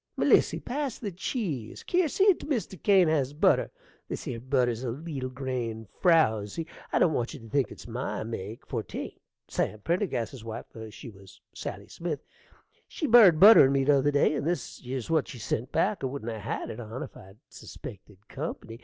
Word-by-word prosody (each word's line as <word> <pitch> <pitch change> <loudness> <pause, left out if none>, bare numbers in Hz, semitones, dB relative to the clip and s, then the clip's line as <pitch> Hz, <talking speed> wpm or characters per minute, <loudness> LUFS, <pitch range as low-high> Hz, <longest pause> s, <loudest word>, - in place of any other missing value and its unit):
Melissy, - - +4
pass 270 -1 -3
the 205 -4 -5
cheese. 170 - -4
Kier, 355 -3 +2
see't 385 -1 +3
Mr. 215 - -3
Crane 190 -4 +5
has 145 -4 +1
butter. 150 - +3 0.4
This - - -5
'ere 120 -4 -3
butter's 125 -2 0
a 125 - -2
leetle 135 0 -4
grain 125 -4 -4 0.2
frouzy. 155 - +3 0.3
I - - +2
don't 160 - +4
want 120 +4 -2
you - - -9
to 115 - -12
think 140 +2 +1
it's - - -11
my 120 0 -3
make, 110 +1 -6
for't 115 -5 -5
ain't. - - -6 0.3
Sam 110 - -1
Pendergrass's 135 - -2
wife 115 -1 -6 0.2
(she 115 +3 -10
'twas 95 -2 -16
Sally - - -6
Smith) 165 -4 -5 0.6
she 315 - -4
borrowed 220 - +7
butter 205 -6 +10
o' - - 0
me 135 -1 +2
t'other 140 0 +4
day, 145 +1 +3
and 145 0 -2
this 175 +1 -3
'ere's 130 +2 -4
what 160 -3 +2
she - - -8
sent 120 +3 -3
back. 190 +2 +1
I - - +1
wouldn't 130 -3 -5
'a' 110 - -5
had 105 - -4
it 110 - -8
on 115 +2 -6
if - - -10
I'd 95 +2 -14
suspected 100 +1 -11
company. 130 -5 -6
135 Hz, 190 wpm, -28 LUFS, 115-170 Hz, 0.6 s, butter